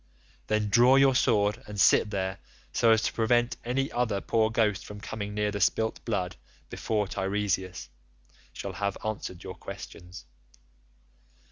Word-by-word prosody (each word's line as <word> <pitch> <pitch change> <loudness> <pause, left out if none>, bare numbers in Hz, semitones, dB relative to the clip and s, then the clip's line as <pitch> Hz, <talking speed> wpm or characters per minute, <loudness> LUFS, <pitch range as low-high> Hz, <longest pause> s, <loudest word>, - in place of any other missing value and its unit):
Then 110 -1 0
draw 120 +5 +6
your 135 0 +5
sword 105 -4 +2
and 105 -1 -6
sit 105 - +5
there, 95 -1 -3 0.3
so 115 - +3
as 110 0 +4
to - - -1
prevent 120 +2 +2
any 135 +3 -1
other 120 -5 0
poor 110 +2 +1
ghost 110 -3 +1
from 105 0 -9
coming 105 0 -5
near 105 0 0
the 100 -1 -4
spilt 110 +4 +1
blood 95 -6 -2 0.3
before 105 -2 -1
Teiresias 95 -3 -2 0.6
shall - - -6
have 100 -1 -2
answered 100 -4 -4
your - - -6
questions. 90 +2 -10
105 Hz, 145 wpm, -28 LUFS, 100-115 Hz, 0.6 s, draw